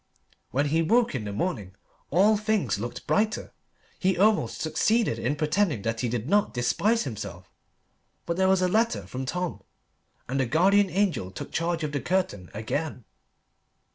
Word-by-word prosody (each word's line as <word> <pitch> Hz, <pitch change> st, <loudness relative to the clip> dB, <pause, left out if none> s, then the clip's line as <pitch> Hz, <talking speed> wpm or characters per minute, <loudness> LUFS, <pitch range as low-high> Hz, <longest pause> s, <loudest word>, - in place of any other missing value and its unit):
When 140 Hz, +4 st, 0 dB
he 160 Hz, +3 st, +2 dB
woke 230 Hz, +7 st, +3 dB
in 125 Hz, -6 st, -3 dB
the 105 Hz, -, -4 dB
morning 100 Hz, -, -3 dB, 0.3 s
all 200 Hz, +7 st, +4 dB
things 205 Hz, -, 0 dB
looked 120 Hz, +3 st, -6 dB
brighter. 215 Hz, 0 st, 0 dB, 0.5 s
He 190 Hz, -1 st, +1 dB
almost 200 Hz, -, +2 dB
succeeded 155 Hz, -, +1 dB
in 130 Hz, +6 st, 0 dB
pretending 155 Hz, -, 0 dB
that 115 Hz, 0 st, -2 dB
he 125 Hz, -, -1 dB
did 120 Hz, 0 st, -3 dB
not 205 Hz, -1 st, +2 dB
despise 200 Hz, -, +1 dB
himself. 95 Hz, -, -7 dB, 0.8 s
But 170 Hz, -, -1 dB
there 190 Hz, +1 st, +2 dB
was 190 Hz, -1 st, +3 dB
a -, -, +4 dB
letter 225 Hz, +5 st, +1 dB
from 130 Hz, +1 st, -5 dB
Tom, 180 Hz, +3 st, -3 dB, 0.7 s
and 135 Hz, +2 st, -1 dB
the 130 Hz, -, +1 dB
guardian 195 Hz, -, +4 dB
angel 180 Hz, -, 0 dB
took 95 Hz, -, -8 dB
charge 165 Hz, 0 st, -1 dB
of 150 Hz, -, -2 dB
the 145 Hz, -, -2 dB
curtain 175 Hz, -, -1 dB
again. 125 Hz, +4 st, -4 dB
160 Hz, 165 wpm, -26 LUFS, 120-195 Hz, 0.8 s, all